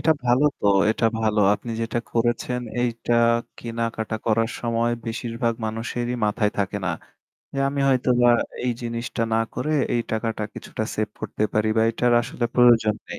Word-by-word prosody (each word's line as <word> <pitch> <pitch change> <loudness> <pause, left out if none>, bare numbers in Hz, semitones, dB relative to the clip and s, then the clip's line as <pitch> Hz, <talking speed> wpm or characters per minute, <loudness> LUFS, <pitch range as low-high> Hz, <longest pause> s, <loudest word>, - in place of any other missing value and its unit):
এটা 160 - +4
ভালো 125 +4 +3 0.2
তো। - - 0 0.2
এটা 115 - -1 0.2
ভালো। 110 -1 +2
আপনি 115 +4 -7
যেটা 115 +1 -1
করেছেন 120 +1 0 0.2
এইটা 120 -1 -1 0.5
কেনাকাটা 115 -1 -3
করার 115 +1 +2
সময় 115 0 0 0.2
বেশিরভাগ 115 +1 -2
মানুষেরই 120 +2 -3
মাথায় 105 0 +1
থাকে 100 0 -1
না। 90 - 0 0.6
যে - - -3
আমি 140 0 -2
হয়তোবা 125 -2 +3 0.4
এই 125 - +1
জিনিসটা 115 0 -3
না - - +3 0.2
করে 155 - -2 0.2
এই 120 - +2
টাকাটা 110 -1 -2
কিছুটা - - -5
সেভ - - -1
করতে 105 - -2
পারি 105 0 +1
বা 110 - +4
এটার 120 +1 +1
আসলে 120 0 -4
প্রয়োজন 120 -3 +5
নেই। - - -50
115 Hz, 160 wpm, -23 LUFS, 110-120 Hz, 0.6 s, প্রয়োজন